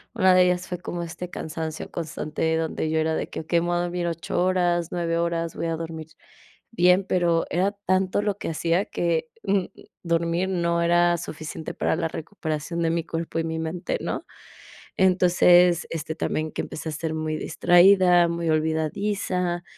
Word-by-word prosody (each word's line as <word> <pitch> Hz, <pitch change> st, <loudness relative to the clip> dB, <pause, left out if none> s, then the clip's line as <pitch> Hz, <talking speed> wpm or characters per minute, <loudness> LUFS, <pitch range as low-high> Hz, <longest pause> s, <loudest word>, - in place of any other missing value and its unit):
una 190 Hz, -5 st, +5 dB
de 180 Hz, 0 st, +6 dB
ellas 180 Hz, 0 st, 0 dB
fue 180 Hz, -, -5 dB
como 175 Hz, -1 st, -5 dB
este 175 Hz, +2 st, -7 dB
cansancio 160 Hz, -1 st, -5 dB
constante 160 Hz, 0 st, -2 dB
donde 160 Hz, -1 st, -2 dB
yo 160 Hz, -, 0 dB
era 160 Hz, 0 st, +1 dB
de -, -, -3 dB
que: -, -, -5 dB
"Okey, 170 Hz, +2 st, +1 dB
me 175 Hz, -, -2 dB
voy 175 Hz, -, 0 dB
a -, -, +1 dB
dormir 175 Hz, 0 st, -2 dB
8 170 Hz, +1 st, -2 dB
horas, 175 Hz, -2 st, +1 dB
9 170 Hz, -1 st, -1 dB
horas, 170 Hz, -1 st, -1 dB
voy 165 Hz, -, -2 dB
a 165 Hz, -, -1 dB
dormir 160 Hz, -1 st, -6 dB, 0.6 s
bien", 180 Hz, -1 st, +4 dB
pero 175 Hz, -3 st, +1 dB
era 190 Hz, +4 st, +1 dB
tanto 185 Hz, +1 st, +1 dB
lo 205 Hz, -2 st, -1 dB
que -, -, -4 dB
hacía 170 Hz, +4 st, 0 dB
que, 165 Hz, -2 st, -1 dB
mm, 195 Hz, -2 st, +1 dB, 0.4 s
dormir 170 Hz, +2 st, 0 dB
no 170 Hz, -2 st, 0 dB
era 175 Hz, 0 st, +3 dB
suficiente 160 Hz, -1 st, -6 dB
para -, -, 0 dB
la 160 Hz, -, -1 dB
recuperación 160 Hz, -1 st, -4 dB
de 165 Hz, -, +2 dB
mi 170 Hz, 0 st, 0 dB
cuerpo 165 Hz, 0 st, -4 dB
y -, -, 0 dB
mi 160 Hz, 0 st, -3 dB
mente, 160 Hz, +2 st, -3 dB
¿no?, -, -, -4 dB, 0.7 s
entonces, 180 Hz, -1 st, +5 dB
este, 160 Hz, -1 st, -4 dB
también 155 Hz, -1 st, -2 dB
que -, -, -3 dB
empecé 160 Hz, -, -6 dB
a -, -, -4 dB
ser 160 Hz, +1 st, -3 dB
muy 155 Hz, 0 st, -2 dB
distraída, 175 Hz, +2 st, +5 dB
muy 170 Hz, -1 st, -2 dB
olvidadiza, 175 Hz, +3 st, -1 dB
170 Hz, 180 wpm, -24 LUFS, 160-180 Hz, 0.7 s, de